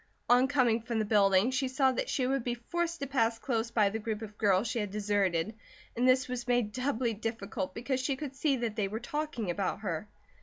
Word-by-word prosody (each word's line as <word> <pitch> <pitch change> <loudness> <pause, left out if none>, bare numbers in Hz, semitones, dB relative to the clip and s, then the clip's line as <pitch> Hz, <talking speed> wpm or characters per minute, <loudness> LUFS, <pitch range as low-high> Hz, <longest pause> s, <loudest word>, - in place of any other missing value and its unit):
On 250 +2 +5
coming 250 -5 +2
from 230 0 -3
the 215 - +1
building 200 +1 +4
she 265 0 0
saw 265 +1 +2
that 255 - -2
she 260 - 0
would 270 -1 0
be 240 0 -1
forced 340 +6 -3
to - - 0
pass 230 -4 +1
close 230 -2 -1
by 210 -4 +2
the 220 - -3
group 220 0 -3
of 210 -1 -9
girls 205 0 +2
she 240 +1 -1
had 210 -2 -2
deserted 200 -2 0 0.4
and 245 +2 +2
this 255 0 +4
was 250 -1 -4
made 245 -4 +2
doubly 250 -1 -1
difficult 215 -3 -4
because 255 +3 -1
she 265 +1 0
could 275 -1 -6
see 280 0 +2
that 235 -4 -2
they 210 -3 0
were 215 +3 -4
talking 245 - -3
about 195 +3 -2
her. 190 0 -3
235 Hz, 225 wpm, -31 LUFS, 210-260 Hz, 0.4 s, On